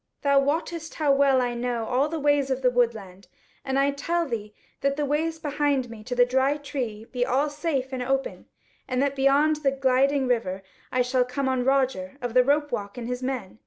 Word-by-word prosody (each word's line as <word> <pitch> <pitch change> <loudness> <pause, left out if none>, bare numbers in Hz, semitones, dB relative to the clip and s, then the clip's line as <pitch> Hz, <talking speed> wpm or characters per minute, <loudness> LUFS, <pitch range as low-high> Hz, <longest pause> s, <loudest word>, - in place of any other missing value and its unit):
Thou 280 -1 +4
wottest 320 +3 -2
how 300 -3 +2
well 275 -2 +4
I 245 -1 -1
know 240 -1 -2
all 265 +6 +1
the 325 0 -3
ways 290 -1 +2
of 265 0 -2
the 250 - +4
woodland, 220 -6 -1 0.4
and 265 0 -1
I 275 +1 +3
tell 335 +5 -1
thee 215 -4 -5 0.2
that 275 0 0
the 295 0 -1
ways 320 +3 -1
behind 290 -5 -1
me 220 -2 -10
to 250 0 -3
the 245 0 +5
Dry 265 +3 +1
Tree 250 -7 -5
be 250 -1 0
all 275 +4 +1
safe 290 -4 -2
and 255 - -3
open, 270 +2 -2 0.4
and 255 -1 -1
that 280 -1 0
beyond 280 +3 +3
the 290 -2 +1
Gliding 270 0 +2
River 195 -6 -1 0.3
I 255 0 +2
shall 250 0 +2
come 255 +2 -3
on 260 -1 0
Roger 265 -7 0
of 245 -3 -4
the 250 0 +6
Ropewalk 280 -7 -1
and 235 -1 -5
his 250 0 -3
men. 255 -6 -4
265 Hz, 205 wpm, -25 LUFS, 245-285 Hz, 0.4 s, the